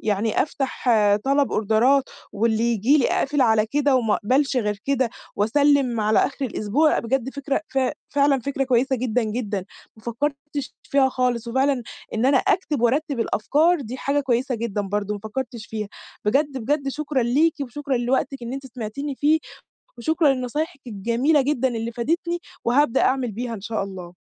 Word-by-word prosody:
يعني 210 +1 +1
أفتَح 270 -3 -4 0.4
طلَب 275 0 +2
أوردرات 230 +6 +3 0.3
واللي 220 +1 +1
ييجي 235 +5 +3
لي 250 - +3
أقفِل 285 0 0
على 220 -3 +4
كده 285 +1 +2
وما 225 -4 +2
أقبَلش 265 +5 +1
غير 210 -4 0
كده 265 -4 +1 0.3
وأسلّم 260 +2 +3
على 215 +1 +3
آخِر 275 -1 0
الأسبوع 250 +8 +1
بجد 265 +2 -1
فكرة 280 +1 -2
ف 270 - -1 0.3
فعلًا 280 -2 +2
فكرة 275 +2 -1
كويسة 260 +1 +2
جدًا، 245 0 0
جدًا، 210 -4 -3 0.3
ما 220 - -18
فكّرتش 280 +3 -4
فيها 275 -1 +2
خالص 245 -2 -1
وفعلًا 265 +1 +1 0.3
إن 230 +4 +1
أنا 270 -1 +5
أكتِب 300 -3 0
وأرتِّب 275 +2 +1
الأفكار 305 +10 +2
دي 250 +1 -6
حاجة 280 +2 0
كويسة 255 -1 0
جدًا 225 -3 -2
برضه 205 +1 -2
ما 205 - -7
فكّرتش 230 -1 -5
فيها. 215 -2 -4 0.4
بجد، 275 +5 +1
بجد 275 +4 -1
شكرًا 285 -2 -1
ليكِ 295 +8 +3
وشكرًا 275 +1 -3
لوقتِك 255 +1 -1
إن 235 +2 -5
أنتِ 270 0 -6
سمعتيني 260 +4 -5
فيه 300 +4 +3 0.6
وشكرًا 315 +2 +2
لنصايحِك 280 +6 -3
الجميلة 235 +8 +1
جدًا 265 -2 +1
اللي 230 -1 -3
فادِتني 340 +8 -1 0.3
وهابدأ 265 +1 +3
أعمل 260 -3 +1
بيها 235 +2 -4
إن 200 - -7
شاء 220 -1 -2
الله. 180 -2 -9
255 Hz, 165 wpm, -23 LUFS, 225-280 Hz, 0.6 s, أنا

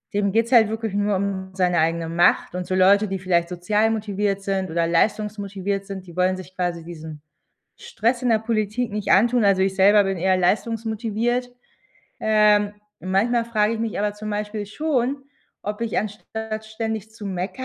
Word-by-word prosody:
dem 200 -1 +1
geht's 230 +3 +1
halt 225 -4 +6
wirklich 220 -2 -3
nur 205 0 +1
um 190 -1 -2
seine 180 -2 +2
eigene 165 +1 0
Macht 170 +1 +2
und 180 0 -4
so 185 - -1
Leute, 200 +3 +5
die 195 0 -3
vielleicht 175 -2 0
sozial 210 +5 +1
motiviert 205 -2 -1
sind 190 -2 -1
oder 165 0 0
leistungsmotiviert 200 +1 -1
sind, 190 -2 -7
die 170 -1 -13
wollen 185 +1 +1
sich 185 0 -11
quasi 175 -2 -2
diesen 160 -3 -9 0.6
Stress 255 - -1
in 245 - +1
der 220 - +4
Politik 220 +1 -1
nicht 210 -1 -1
antun. 230 +3 +4
Also, 195 -1 +4
ich 190 0 +1
selber 205 +2 +6
bin 195 -1 -1
eher 185 +1 +2
leistungsmotiviert. 225 +4 -1 0.7
Ähm, 210 -1 +3 0.3
manchmal 225 +6 +1
frage 220 -1 +1
ich 225 - -4
mich 225 -3 -2
aber 205 0 0
zum 215 0 -6
Beispiel 210 0 -3
schon, 270 +1 -1 0.4
ob 210 +2 -4
ich 230 -2 -1
anstatt 215 +1 -5
ständig 220 -1 -4
zu 215 -2 -9
meckern 190 +7 -4
205 Hz, 175 wpm, -23 LUFS, 190-220 Hz, 0.7 s, halt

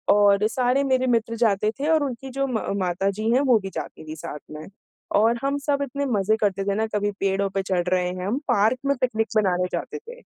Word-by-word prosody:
और 205 0 +4
सारे 250 +4 +1
मेरे 260 -1 +1
मित्र 230 -1 +1
जाते 215 -2 +2
थे 290 - -1
और 315 -2 +4
उनकी 270 0 -5
जो 275 0 +1
म 245 -4 -1 0.2
माता 185 +1 0
जी 220 +1 0
हैं 255 +3 +4
वो 245 -3 +6
भी 195 -1 -6
जाती - - -6
थीं 155 - -5
साथ 150 -1 -7
में। 155 +1 -8 0.5
और 230 +3 +3
हम 280 +1 0
सब 285 0 -1
इतने 280 +1 -3
मज़े 215 -4 +1
करते 195 -2 +1
थे 200 0 0
ना, 220 +1 +1
कभी 205 -1 -1
पेड़ों 195 0 +1
पे 195 0 -1
चढ़ 185 -2 0
रहे 180 -1 +1
हैं 180 0 -5
हम 225 +6 0
पार्क 215 +5 +3
में 280 0 +2
पिकनिक 225 -3 +1
मनाने 180 -3 +2
जाते 440 - -4
थे 475 +3 -12
220 Hz, 230 wpm, -24 LUFS, 195-260 Hz, 0.5 s, वो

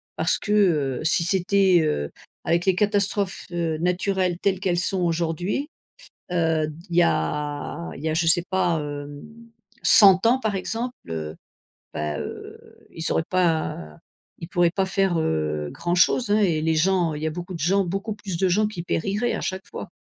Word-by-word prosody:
parce - - +1
que, 205 - -5
heu, 155 -11 +2
si 160 +1 +2
c'était, 190 -1 +3
heu, 75 - -1 0.3
avec 170 +1 +1
les 190 -2 +3
catastrophes, 200 -1 0
heu, 165 -2 -1
naturelles 180 0 0
telles 190 -1 0
qu'elles 175 -2 +1
sont 185 +1 -1
aujourd'hui, 175 - -1 0.6
heu, 160 -3 +1
d 155 - -7 0.2
il - - -2
y - - +7
a 145 - -2
il 140 - -10
y 160 - 0
a - - 0
je 165 +1 +1
sais 170 +1 +4
pas, 175 -3 +1
hem, 145 0 -7 0.6
100 195 -1 +7
ans 250 +3 +3
par 220 -5 -1
exemple, 230 +6 -3 0.2
heu, 80 -1 -5 0.6
ben, 75 0 -3
heu, - - -8 0.3
ils 160 - -3
auraient - - +1
pas 160 - -1 0.4
ils 165 - -7
pourraient 175 -1 +2
pas 190 +2 0
faire, 190 -2 +1
heu, 75 - -1
grand 175 0 -2
chose 210 +5 +3
hein 210 - +4
et 170 -7 +2
les 160 0 +1
gens 175 -1 +2
il 150 - -6
y - - 0
a - - -2
beaucoup 175 +3 -6
de - - -7
gens, 190 +6 +2
beaucoup 195 +5 -3
plus 200 -4 -6
de 190 - +2
gens 210 +4 +2
qui 210 -5 -6
périraient 200 +7 -1
à - - -3
chaque 190 0 -4
fois. - - -8
175 Hz, 190 wpm, -24 LUFS, 155-195 Hz, 0.6 s, y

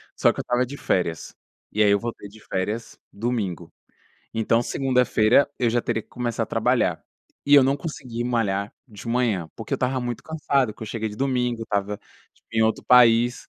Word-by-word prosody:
Só - - +4
que - - -8
eu - - +1
estava 125 +1 0
de 140 +3 -8
férias. 85 -3 -1 0.4
E 105 - 0
aí 105 - +5
eu 100 - +3
voltei 115 -3 -6
de 110 +2 -16
férias 105 +5 -3
domingo. 105 -5 -3 0.6
Então, 115 +1 +1
segunda-feira 125 -1 +3
eu 120 - +2
já 120 +1 +1
teria 115 - -1
que - - -35
começar 120 -2 -2
a - - -16
trabalhar. - - +1 0.4
E 145 - +5
eu 140 - +9
não 135 +2 +2
consegui 130 -6 -5
malhar 105 -4 -1
de 105 -3 -12
manhã, 115 -9 0
porque - - -8
eu - - +2
estava 130 +1 0
muito 120 -1 -4
cansado, 140 -7 0
porque 110 - -12
eu 110 - -5
cheguei 110 0 -3
de 105 - -9
domingo, 125 -3 0
estava 105 -2 -2 0.5
em 110 - +2
outro 110 0 0
país. 120 0 +5
115 Hz, 190 wpm, -24 LUFS, 105-125 Hz, 0.6 s, eu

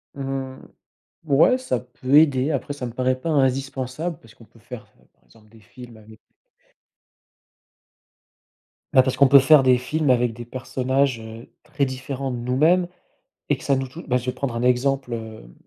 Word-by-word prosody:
Mmh, 135 -1 -5 0.7
ouais, 155 - +4
ça 255 - -2
peut 125 +2 -6
aider, 145 -2 +4
après 145 0 -3
ça 140 -3 -6
me 120 - -6
paraît 130 +1 -1
pas 165 - -4
indispensable 135 +2 -1
parce 115 0 -19
qu'on - - -18
peut 115 - -23
faire, 120 -1 -10 0.2
heu, - - -28
par - - -39
exemple 110 -1 -23
des 110 0 -19
films 120 +3 -14
avec 110 0 -17 2.7
bah 130 - +6
parce 130 0 -2
qu'on 135 0 +4
peut 140 0 +8
faire 140 +1 +5
des 130 -1 +4
films 150 +4 -2
avec 120 -2 +2
des 120 +2 -9
personnages, 130 +1 -2
heu, 110 +2 -11 0.2
très 140 - -2
différents 135 +1 -5
de 125 - -4
nous-mêmes 155 +9 +1 0.6
et - - +2
que - - -14
ça 140 - +2
nous 135 0 -3
touche 165 +7 -11
bah, 125 - 0
je 125 -1 -1
vais 125 - -1
te 125 - -19
prendre 130 -4 -3
un 115 - -3
exemple, 125 0 0
hem, 110 - -9
130 Hz, 190 wpm, -22 LUFS, 120-140 Hz, 2.7 s, peut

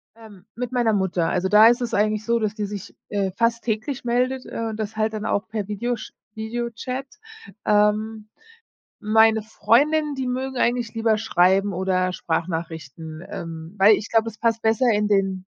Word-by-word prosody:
Ähm, 210 -4 -15
mit 250 +1 -4
meiner 240 -3 +2
Mutter. 185 -4 0
Also, 185 +1 0
da 210 +2 +8
ist 240 +1 +3
es 240 - -3
eigentlich 215 +1 +1
so, 235 0 +2
dass 215 -1 -1
die 210 -1 -3
sich, 200 -1 -8
äh, 195 -2 -1
fast 230 +3 0
täglich 235 +4 -3
meldet, 250 +2 0
äh, - - -7
und 215 - -5
das 215 0 -4
halt 220 0 0
dann 215 0 -4
auch 200 -1 -1
per 210 -2 -4
Video 235 +4 -2
sch - - -10 0.2
Videochat. 240 +4 -4 0.6
Ähm, 210 +1 +1 0.7
meine 220 0 +4
Freundinnen, 285 +8 +2
die 265 -2 -3
mögen 260 +1 -3
eigentlich 240 -1 0
lieber 225 -1 +1
schreiben 195 -1 +2
oder 185 0 0
Sprachnachrichten, 160 -2 -4
ähm, 165 +1 -7
weil, 200 +3 +7
ich 215 - -6
glaube, 225 0 +2
es 220 -1 -10
passt 230 -1 +1
besser 225 +3 +2
in 210 0 +1
den 195 -2 +1
215 Hz, 175 wpm, -23 LUFS, 195-235 Hz, 0.7 s, da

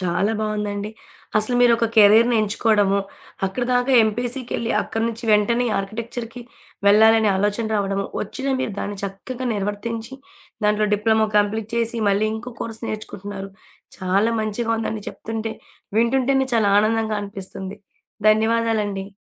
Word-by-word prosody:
చాలా 185 +4 0
బావుందండి. 210 -1 -2 0.5
అసలు 215 +3 0
మీరొక 235 -1 +4
కెరియర్‌ని 225 +3 +6
ఎంచుకోవడమో? 205 -1 +2 0.5
అక్కడి 220 +6 -3
దాకా 245 +2 +2
ఎంపీసీకేళ్లి 240 +1 -2
అక్కడి 225 0 -3
నుంచి 230 +1 -6
వెంటనే 235 +4 +3
ఆర్కిటెక్చర్‌కి 230 +4 -5 0.5
వెళ్లాలనే 220 +1 +6
ఆలోచన 205 +3 0
రావడము 195 -1 -1
వచ్చిన 265 +6 -4
మీరు 220 - -2
దాన్ని 205 0 -4
చక్కగా 235 +6 -6
నిర్వర్తించి, 220 +4 -4 0.5
దాంట్లో 210 0 +2
డిప్లొమో 220 +1 +2
కంప్లీట్ 210 +1 0
చేసి 230 0 0
మళ్ళీ 200 +2 +2
ఇంకో 240 +3 -7
కోర్స్ 225 0 -5
నేర్చుకుంటున్నారు. 200 -2 -6 0.5
చాలా 195 +4 +1
మంచిగా 215 +2 -2
ఉందని 220 -1 -3
చెప్తుంటే 225 0 -5 0.5
వింటుంటేనే 265 +3 +2
చాలా 215 -3 +3
ఆనందంగా 220 0 +1
అనిపిస్తుంది. 195 0 -7 0.5
ధన్యవాదాలండి. 215 -2 +1
220 Hz, 120 wpm, -22 LUFS, 205-230 Hz, 0.5 s, కెరియర్‌ని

